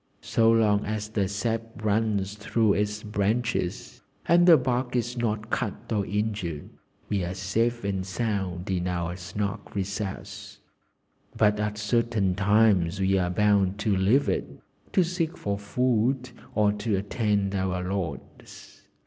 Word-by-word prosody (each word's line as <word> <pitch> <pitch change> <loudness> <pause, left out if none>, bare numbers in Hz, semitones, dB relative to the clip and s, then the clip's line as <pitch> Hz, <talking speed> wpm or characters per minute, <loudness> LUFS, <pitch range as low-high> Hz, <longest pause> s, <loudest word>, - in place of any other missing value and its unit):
So 115 0 +3
long 105 -2 +3
as 105 0 -3
the 105 -3 0
sap 110 +3 -1 0.2
runs 105 -2 +1
through 105 +1 +1
its 105 +1 -1
branches, 105 -1 -1 0.2
and 175 +1 +5
the 165 -3 +9
bark 125 -1 -1
is 120 0 -1
not 110 -2 -2
cut 115 -1 -3
or 100 -3 0
injured, 105 -7 -3 0.4
we 100 -3 -1
are 90 +2 -3
safe 115 +5 0
and 95 -2 -1
sound 95 -3 -2
in 90 -1 -1
our 85 -1 -2
snug 100 +4 -5
recess, 100 0 -5 0.8
but 105 -1 +3
at 105 0 -2
certain 105 -3 +1
times 100 -2 +3
we 95 0 +2
are 90 -1 0
bound 100 0 +2
to 105 -2 +2
leave 105 +10 +3
it, - - -1 0.4
to 185 - +4
seek 170 -1 -2
for 100 0 -2
food, 125 +3 0 0.2
or 105 -1 +4
to 105 0 -1
attend 100 -1 0
our 95 -1 -1
lords. 95 -3 -7
105 Hz, 140 wpm, -26 LUFS, 95-115 Hz, 0.8 s, the